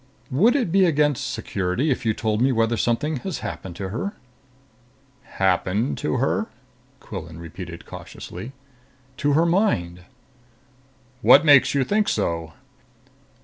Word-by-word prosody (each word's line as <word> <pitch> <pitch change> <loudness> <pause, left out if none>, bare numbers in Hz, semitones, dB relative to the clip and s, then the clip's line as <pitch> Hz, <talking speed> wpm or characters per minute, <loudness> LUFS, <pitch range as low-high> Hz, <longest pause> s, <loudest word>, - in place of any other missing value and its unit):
"Would 210 - +4
it 245 -12 0
be 190 +1 +5
against 150 -5 +1
security 95 +11 -1
if 125 - -2
you 110 - +2
told 110 0 -1
me 130 +2 +3
whether 115 -1 +1
something 130 +7 0
has 180 +6 -5
happened 85 +1 -6
to 95 0 -5
her?" 195 - -3 1.2
"Happened 95 +5 +1
to 150 - -1
her?" 140 - 0 0.5
Quillan 85 -5 -8
repeated 85 +1 -9
cautiously. 125 - -9 0.7
"To 145 +2 +1
her 160 +4 +4
mind." 90 - 0 1.2
"What 140 +5 +7
makes 145 -2 +6
you 140 - +3
think 210 +8 +1
so?" 85 -5 -2
120 Hz, 130 wpm, -23 LUFS, 90-150 Hz, 1.2 s, What